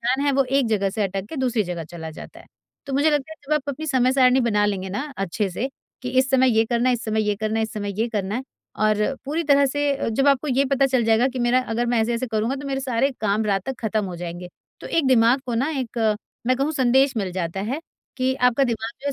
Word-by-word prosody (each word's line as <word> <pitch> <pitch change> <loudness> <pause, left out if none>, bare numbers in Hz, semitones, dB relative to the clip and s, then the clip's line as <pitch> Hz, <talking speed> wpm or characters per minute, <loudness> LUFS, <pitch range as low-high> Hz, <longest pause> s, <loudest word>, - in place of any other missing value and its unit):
Plan 260 +4 0
है 280 - +3
वो 270 0 +3
एक 270 -1 +1
जगह 200 -3 +1
से 215 +1 -2
अटक 195 0 -3
के 315 - -7
दूसरी 250 -4 +1
जगह 175 -3 -5
चला 160 0 -8
जाता 155 - -11
है। - - -17 0.4
तो 275 - -5
मुझे 290 +3 +3
लगता 295 +1 -1
है - - -11
जब - - -1
आप 300 - 0
अपनी 310 +3 -4
समय-सारिणी 260 -1 +4
बना 210 -4 +2
लेंगे 190 -2 -2
ना 260 +10 -3
अच्छे 195 +2 -1
से 235 +9 -3 0.3
कि 250 - -3
इस 265 0 +2
समय 260 -1 +4
ये 225 - +5
करना 235 +2 +1
है, 250 - +3
इस 240 - -5
समय 220 0 0
ये 205 - +2
करना 215 +1 -1
है, - - +1
इस 220 - -3
समय 205 -1 -4
ये 230 - +1
करना 205 -2 -2
है। 255 - -2 0.3
और 215 +4 +1
पूरी 310 +5 -1
तरह 280 -1 +4
से 280 -3 -1
जब 270 +5 +2
आपको 280 +2 +2
ये 270 +2 +2
पता 275 0 +4
चल 255 -3 +1
जाएगा 225 +3 +3
कि 260 - -6
मेरा 245 +1 +3
अगर 235 +2 0
मैं 235 -1 +2
ऐसे-ऐसे 235 +2 -1
करूँगा 225 +2 -1
तो 280 +1 -7
मेरे 270 -1 -2
सारे 265 +1 +1
काम 215 +1 +1
रात 195 -2 +1
तक 265 - -3
खत्म 215 -2 -1
हो 180 -2 -6
जाएँगे। 175 +1 -6 0.3
तो - - -8
एक 320 -5 +1
दिमाग 250 +1 +4
को 240 - -2
ना 265 +6 +1
एक 225 -3 0 0.3
मैं 255 0 +3
कहूँ 285 +4 0
संदेश 265 -1 +3
मिल 195 -4 -1
जाता 180 +1 -3
है 255 +10 -3 0.4
कि 260 0 +1
आपका 250 +2 +4
दिमाग 225 -2 -2
जो 285 - -7
हैं 280 - 0
240 Hz, 265 wpm, -23 LUFS, 215-270 Hz, 0.4 s, ये